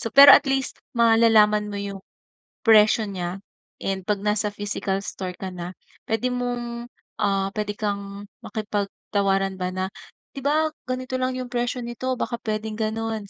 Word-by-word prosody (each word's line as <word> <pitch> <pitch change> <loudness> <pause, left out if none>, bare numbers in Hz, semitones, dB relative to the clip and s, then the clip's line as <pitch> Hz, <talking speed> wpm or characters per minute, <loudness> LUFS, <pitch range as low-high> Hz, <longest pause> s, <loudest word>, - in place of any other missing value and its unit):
So, - - -2
pero 280 +1 +11
at 275 - +6
least 270 -1 -1 0.2
malalaman 225 -2 +5
mo 205 - -5
yung, 200 -1 -5 0.7
presyo 215 0 +6
nya, 185 -2 -4 0.5
and 195 0 -1
'pag 210 -1 +1
nasa 210 0 +1
physical 205 -1 -2
store 185 -2 -5
ka 190 -1 -5
na, 180 0 -7 0.3
puwede 240 +3 0
mong, 240 -1 -3 0.3
ah, 195 -2 +1
puwede 210 -1 -2
kang 200 -1 -4 0.2
makipagtawaran 200 -2 -1
ba 180 0 -1
na, 185 0 -2 0.5
"Di 275 - -5
ba 310 +2 +2 0.2
ganito 255 0 -3
lang 255 0 0
yung 255 - -3
presyo 245 0 -1
nito, 250 +2 -3
baka 235 - -2
puwedeng 215 0 -3
gano'n." 220 -1 -2
215 Hz, 155 wpm, -24 LUFS, 200-240 Hz, 0.7 s, pero